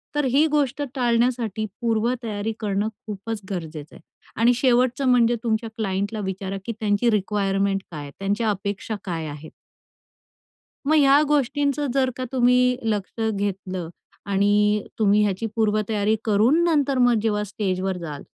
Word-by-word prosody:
तर 295 -1 +1
ही 285 +5 +4
गोष्ट 290 -2 0
टाळण्यासाठी 235 -3 +1 0.2
पूर्व 230 +1 +1
तयारी 215 0 -3
करणं 205 0 -1
खूपच 215 0 -6
गरजेचं 160 -5 -6
आहे. - - -14 0.3
आणि 235 +3 +4
शेवटचं 255 +1 +2
म्हणजे 240 -1 +4
तुमच्या 225 0 -1
क्लायन्टला 205 +1 -2
विचारा 190 +1 -4
की - - -2
त्यांची 215 +1 +2
रिक्वायरमेंट 195 -1 0
काय 155 -3 -6
आहे, 145 -1 -8
त्यांच्या 205 +3 0
अपेक्षा 200 +2 -3
काय 165 -4 -3
आहेत. 150 +1 -9 1.4
मग 310 - +4
ह्या 285 -1 +6
गोष्टींचं 290 0 +1
जर 265 -1 +2
का 255 - -3
तुम्ही 250 0 +3
लक्ष 215 0 -2
घेतलं 190 -4 -3 0.4
आणि 205 +1 +3 0.2
तुम्ही 210 0 +4
ह्याची 200 +2 -1
पूर्वतयारी 215 -1 +1
करून 225 +10 +3
नंतर 290 -5 +2
मग 245 -1 +4
जेव्हा 210 -1 0
स्टेजवर 190 -2 -2
जाल, 155 -5 -7
215 Hz, 140 wpm, -23 LUFS, 195-245 Hz, 1.4 s, ह्या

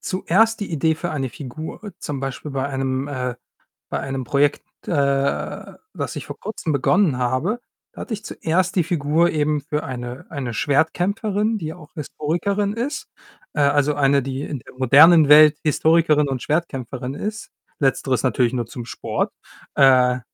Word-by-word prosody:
zuerst 220 +5 +1
die 205 - -4
Idee 160 0 +1
für 175 +2 -4
eine 135 -3 -2
Figur. 155 - -8
Zum 140 -2 -5
Beispiel 135 +2 -5
bei 135 0 -2
einem 135 0 -2
äh 125 -3 -3 0.6
bei - - -2
einem 135 -1 -4
Projekt, 140 +4 +1 0.2
äh, - - -1 1.0
das - - -4
ich - - -6
vor - - -9
Kurzem 200 -7 -4
begonnen 150 +1 +2
habe, 130 - 0 0.3
hatte 235 - -6
ich 210 - -5
zuerst 180 +3 -1
die 175 - +3
Figur 165 0 +2
eben 150 -1 +1
für 150 +1 -3
eine 125 0 -6
eine 130 -6 -4
Schwertkämpferin, 200 - 0
die 160 -5 -5
auch 165 -2 -15
Historikerin 175 +7 -2
ist, 275 +7 -4 0.5
äh, - - -3
also, 145 +1 +3
eine, 140 -1 +3
die 135 +1 -4
in 145 -3 -5
der - - -16
modernen 150 +5 +7
Welt 150 0 +8
Historikerin 155 -1 +3
und 130 -2 -3
Schwertkämpferin 135 -5 -3
ist. 215 +4 -5 0.3
Letzteres 135 -2 +1
natürlich 125 -1 +1
nur 120 -2 -1
zum 120 0 -7
Sport. - - -3 0.4
Äh 130 -2 +5
150 Hz, 155 wpm, -21 LUFS, 135-170 Hz, 1.0 s, Welt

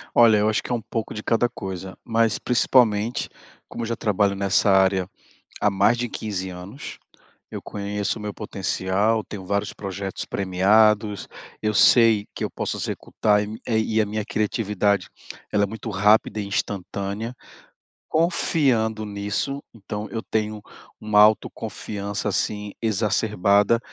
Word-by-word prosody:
Olha, 115 -3 +7
eu 105 +1 +2
acho 110 - 0
que - - -6
é - - +2
um 115 - -3
pouco 110 +1 -4
de 105 - -6
cada 120 +1 +2
coisa, 95 -2 -7
mas, 115 -1 +1
principalmente, 115 -2 +2 0.4
como 120 - -6
eu - - -3
já 115 - -1
trabalho 100 -2 +1
nessa 100 +1 +2
área 95 -1 +3 0.5
há 105 - +3
mais 100 +4 +3
de 120 0 -2
15 95 -5 -4
anos, 90 +9 -9 0.5
eu - - -6
conheço 100 +1 -3
o - - -9
meu 105 -1 -4
potencial, 100 +2 -1
tenho 95 -1 -8
vários 100 +2 -1
projetos 95 -1 -5
premiados, 105 +2 +2 0.3
eu 105 0 0
sei 110 -1 +5
que - - -5
eu - - -1
posso - - -3
executar, 105 -1 0
e 110 +2 -7
e 110 -1 +1
a 105 - +1
minha 105 +1 -3
criatividade, 105 -2 0 0.4
ela 105 - +2
é - - +4
muito 110 +2 -7
rápida 105 +1 +3
e 100 - -3
instantânea. 100 +3 -3 0.7
Confiando 135 -9 +1
nisso, 105 +7 -3
então 105 0 -6
eu 115 - -4
tenho 105 -1 -2 0.4
uma 105 -1 +3
autoconfiança, 105 -1 0
assim, 105 +1 -2
exacerbada 105 -1 +2
105 Hz, 145 wpm, -23 LUFS, 100-110 Hz, 0.7 s, Olha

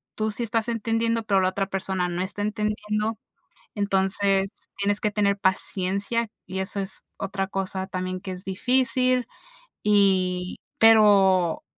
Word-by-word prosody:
tú 215 0 -1
sí 235 - -3
estás 225 0 -1
entendiendo, 230 0 0
pero 195 -3 +2
la 185 - +2
otra 195 +1 -2
persona 190 -2 -2
no 175 +1 -3
está 190 +2 -4
entendiendo, 210 +1 -2 0.6
entonces 195 0 0
tienes 205 +1 0
que 210 - 0
tener 200 -1 +1
paciencia 200 +4 0 0.2
y 185 +1 -5
eso 190 +1 -3
es 190 0 -2
otra 195 -1 -3
cosa 190 0 -3
también 185 -1 -4
que 190 - -6
es 180 0 -7
difícil, 250 +4 +1 0.6
y 185 -3 +2 0.2
pero 200 -6 +5
200 Hz, 140 wpm, -25 LUFS, 190-215 Hz, 0.6 s, pero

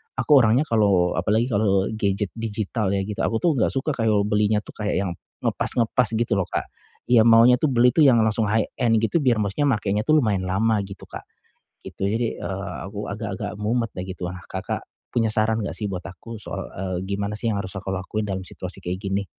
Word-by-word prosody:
aku 130 +3 +4
orangnya 120 +7 +3
kalau 100 -6 +3
apalagi 110 +4 +1
kalau 100 -2 +2
gadget 100 -1 0
digital 110 -2 -2
ya 100 - +1
gitu, 105 +2 -6
aku 115 - 0
tuh 170 - +3
enggak 110 - +2
suka 135 +3 -1
kalau 110 -3 +2
belinya 105 0 +2
tuh - - -11
kayak 105 -1 -1
yang 90 - -2 0.3
ngepas-ngepas 120 +1 +1
gitu 115 +1 +1
loh, 90 - -1
Kak. - - -2 0.4
Ya 115 -3 +6
maunya 115 +2 +7
tuh 155 - +1
beli 125 0 +5
tuh 160 - +4
yang 120 -4 +6
langsung 110 0 +1
high-end 115 +2 +1
gitu 170 +9 +2
biar 120 -4 +3
maksudnya 105 +9 0
makenya 105 -3 0
tuh 155 0 +5
lumayan 105 -8 0
lama 110 +3 +1
gitu, 95 -1 -10
Kak, - - -8 0.6
gitu. 95 - -3
Jadi, 115 +2 -1
eee, 95 -1 -4
aku 100 +1 -6
agak-agak 100 -1 -4
mumet 115 +1 0
ya 90 - -3
gitulah. 90 -1 -5
Kakak - - -4 0.3
punya 115 -2 +2
saran 110 +1 +1
enggak - - -4
sih 105 - -2
buat 90 -1 -4
aku 95 +6 -9
soal, - - -5
eee, 95 0 -3
gimana 100 +1 -2
sih 115 - -1
yang 100 - -1
harus 95 - -6
aku 95 0 -5
lakuin 105 +3 -3
dalam 95 -1 -3
situasi 90 +1 -6
kayak 90 +1 -3
gini? 100 0 -1
105 Hz, 205 wpm, -23 LUFS, 95-115 Hz, 0.6 s, maunya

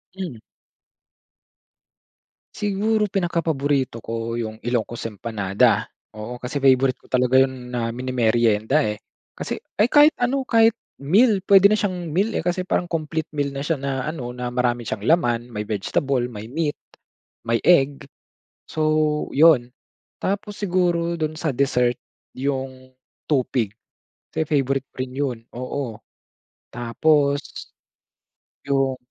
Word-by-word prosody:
Hmm. 180 -11 -5 2.2
Siguro, 210 +1 +1
pinakapaborito 145 -9 0
ko 115 +1 -4
yung 110 -1 -4
Ilocos 120 -1 -2
empanada, 100 -2 +1 0.3
oo. 115 +3 -7
Kasi 125 +4 -3
favorite 130 -1 +4
ko - - -19
talaga 125 0 +4
yun 130 -2 -5
na 115 -1 -1
mini-merienda, 120 +1 +1
eh. 105 0 -3 0.4
Kasi, - - -4 0.2
ay 210 - +5
kahit 295 +1 +7
ano, 255 +3 +1
kahit 225 -1 +5 0.2
meal. 195 - +3
Pwede 200 0 +7
na 215 - +4
siyang 180 -5 -2
meal, 195 +8 +1
eh. - - 0
Kasi, 180 +1 0
parang 180 -1 0
complete 160 -1 -2
meal 145 -1 0
na 140 - -4
siya 165 - +1
na 135 -1 -3
ano. 130 -6 -4
Na 125 0 -4
marami 120 -2 -1
siyang 100 - -4
laman. 120 -7 +2
May 105 -2 -5
vegetable, 120 +5 0
may 105 0 -8
meat, 150 +1 -2 0.7
may 115 0 +1
egg, 140 -5 +4 0.7
so, 155 - -3 0.5
'yon. 140 -5 +5 0.5
Tapos, 205 +1 -2
siguro 175 -3 +1
do'n 155 0 -2
sa 155 - 0
dessert, 125 -2 +2 0.4
yong 130 -1 -3 0.4
tupig, 125 -7 0 0.6
kasi 160 - -1
favorite 135 -2 0
ko - - -54
rin 130 0 -7
'yon, 135 -4 -1 0.2
oo. 125 -2 -4 0.8
Tapos 140 +4 +2 1.2
Yung 135 -2 +1
135 Hz, 130 wpm, -22 LUFS, 120-170 Hz, 2.2 s, kahit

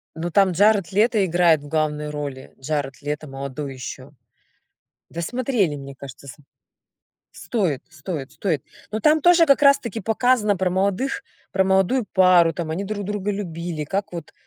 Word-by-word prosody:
Но 170 +2 -4
там 195 +1 +4
Джаред 205 0 +3
Лето 215 0 +3
играет 170 -3 +3
в 145 - -11
главной 150 -1 -1
роли. 140 -3 -6
Джаред 140 -1 -3
Лето 150 +1 -4
молодой 135 +1 -6
ещё. 130 +2 -8 1.0
Да 170 - -5
смотрели, 230 - 0
мне 140 -1 -9
кажется, 135 0 -11
с 130 - -9 1.0
Стоит, 180 - -2
стоит, 155 -3 -6
стоит. 155 -3 -2 0.3
Но 215 - -2
там 305 +7 +4
тоже 345 +1 +6
как 280 -2 +4
раз 280 -1 +6
таки 230 -1 -6
показано 220 0 +2
про 185 0 0
молодых, 200 - -1 0.3
про 190 - +2
молодую 195 +5 +2
пару, 180 -4 +5
там 165 -1 -4
они 165 +5 -2
друг 205 0 -4
друга 205 0 -2
любили, 170 -5 -4
как 195 +5 -3
вот 165 -3 -7
180 Hz, 160 wpm, -22 LUFS, 150-210 Hz, 1.0 s, тоже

